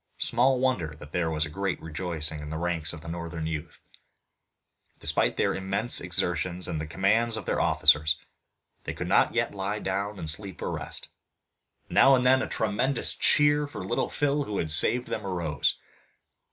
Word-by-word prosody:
Small 125 +2 +3
wonder 95 -13 0
that 75 -1 -12
there 85 -1 0
was 80 -1 0
great 95 +5 -3
rejoicing 80 -2 -2
in 75 0 -7
the 80 - -4
ranks 85 -2 -1
of 85 0 -10
northern 85 -1 -5
youth! 80 0 -5 1.2
Despite - - 0
their - - +1
immense 95 +5 0
exertions 90 0 0
and 80 - -3
the 80 - -5
commands 110 +7 +1
of 105 - -6
their - - 0
officers 75 +1 +4 0.7
they - - -4
could - - -5
not - - +3
yet - - 0
lie 100 +1 -3
down 100 +1 -3
and 80 - -6
sleep 95 +4 +1
or - - -2
rest. - - -5 0.8
Now 135 0 +6
and 125 -1 0
then 130 +1 +5
a - - -2
tremendous 115 +5 -1
cheer 145 0 +3
for 120 -9 -7
Little - - -1
Phil 145 0 0
who 105 -1 -4
had 80 - -2
saved 120 +11 +4
them 110 - -4
arose. 85 -6 -1
90 Hz, 170 wpm, -27 LUFS, 80-110 Hz, 1.2 s, Now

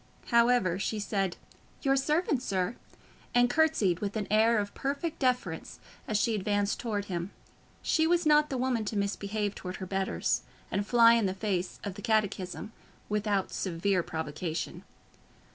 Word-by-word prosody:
However, 235 -7 +4
she 215 +2 -1
said, 195 -3 -1 0.5
"Your 270 -1 +3
servant, 300 0 +1
sir," 190 -2 -1 0.6
and 245 0 +5
curtsied 220 - +2
with 205 +1 -3
an 210 - -1
air 220 +2 +5
of 205 -1 -2
perfect 285 +4 -3
deference 250 - -1 0.3
as 215 - +1
she 225 +2 +2
advanced 205 0 0
towards 210 -5 -2
him: 175 -1 -3 0.5
she 320 -1 +2
was 345 0 +2
not 300 0 +5
the 265 - -2
woman 250 -3 0
to 210 +1 -2
misbehave 200 +1 -1
towards 180 -2 -6
her 185 - -5
betters, 190 +1 0 0.3
and 200 +1 -1
fly 230 -1 +7
in 230 -4 +3
the 190 - -2
face 190 -3 -2
of 200 - -4
the - - -9
catechism, 215 -2 -1 0.4
without 210 -2 0
severe 185 +1 0
provocation. 160 0 -4
210 Hz, 155 wpm, -29 LUFS, 190-245 Hz, 0.6 s, fly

